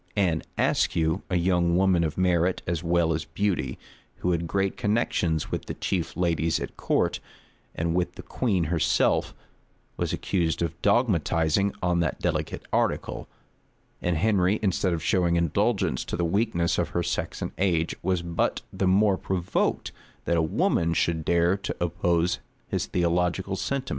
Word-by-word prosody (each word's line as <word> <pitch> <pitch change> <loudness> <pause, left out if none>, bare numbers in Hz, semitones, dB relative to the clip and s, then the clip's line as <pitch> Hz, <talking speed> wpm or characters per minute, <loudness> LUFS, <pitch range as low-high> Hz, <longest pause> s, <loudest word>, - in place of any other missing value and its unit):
Anne 90 -6 +2 0.2
Ascue, 80 +4 +1
a 90 - 0
young 85 -1 +2
woman 95 -2 +3
of 80 -2 -2
merit 90 -1 +2
as 85 0 -2
well 85 -1 +2
as 80 - -2
beauty,[] 80 -6 -2 0.4
who 90 - -1
had 85 -1 -1
great 95 +2 0
connections 90 -7 0
with - - -3
the - - -5
chief 90 -4 -2
ladies 85 -2 +1
at - - -6
court, - - 0 0.6
and 85 0 -1
with 90 0 -1
the - - -9
queen 100 -9 0
herself, 80 -2 +2 0.6
was - - -1
accused 85 -3 0
of 80 -2 -2
dogmatizing 100 - +2
on 90 -1 +2
that 85 -3 -1
delicate - - -2
article; - - -1 0.7
and 90 -2 0
Henry, 100 +1 +2
instead 95 -1 +1
of 85 -2 -2
showing 85 -1 +2
indulgence 85 -6 +1
to - - -4
the 85 - 0
weakness 85 -2 +1
of - - 0
her - - +1
sex - - -3
and - - -3
age, 85 -4 +1
was 90 -1 0
but 85 -1 -1
the 95 - 0
more 100 +1 +4
provoked, 90 -1 -1 0.3
that 85 - +1
a 85 - +3
woman 85 +1 +1
should 80 -2 +1
dare 85 +3 +3
to 100 - -4
oppose 85 0 +1 0.3
his - - -2
theological 90 +2 0
sentiments. 135 +6 -2
85 Hz, 160 wpm, -26 LUFS, 85-95 Hz, 0.7 s, more